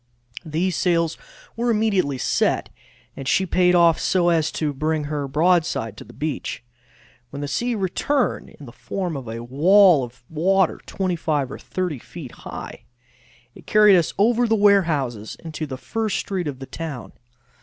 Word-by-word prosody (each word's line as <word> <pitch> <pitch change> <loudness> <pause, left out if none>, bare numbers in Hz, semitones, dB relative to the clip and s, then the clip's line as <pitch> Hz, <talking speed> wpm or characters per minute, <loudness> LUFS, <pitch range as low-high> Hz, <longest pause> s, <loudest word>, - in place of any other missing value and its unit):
These 170 +4 -1
sails 170 -3 +1 0.4
were 240 +1 -1
immediately 205 - +1
set, - - 0 0.5
and 135 - -7
she 190 - +2
payed 180 0 +3
off 170 -2 +5
so 175 -2 +2
as 160 -2 +2
to 150 -2 -1
bring 155 +2 -1
her 145 -1 -3
broadside 155 - +1
to - - -9
the - - -15
beach. 150 -4 -4 0.7
When 140 +2 -6
the - - -3
sea 240 +12 -1
returned, 240 +8 -1
in 145 - -14
the 120 - -11
form 180 +4 -4
of 135 -4 -6
a 115 +1 -5
wall 165 +5 +5
of 125 0 -10
water 185 +3 +1
25 160 -8 -1
or - - -7
30 180 -7 -3
feet 145 -1 -10
high, - - -9 0.7
it - - -16
carried 210 -2 +6
us 170 -3 +2
over 235 +4 +3
the 225 - +3
warehouses 160 - +2
into 155 -1 -5
the 130 -2 -6
first 220 +8 -2
street 185 -5 -3
of 140 -3 -4
the 135 - -8
town. 145 -2 -7
165 Hz, 165 wpm, -22 LUFS, 140-190 Hz, 0.7 s, carried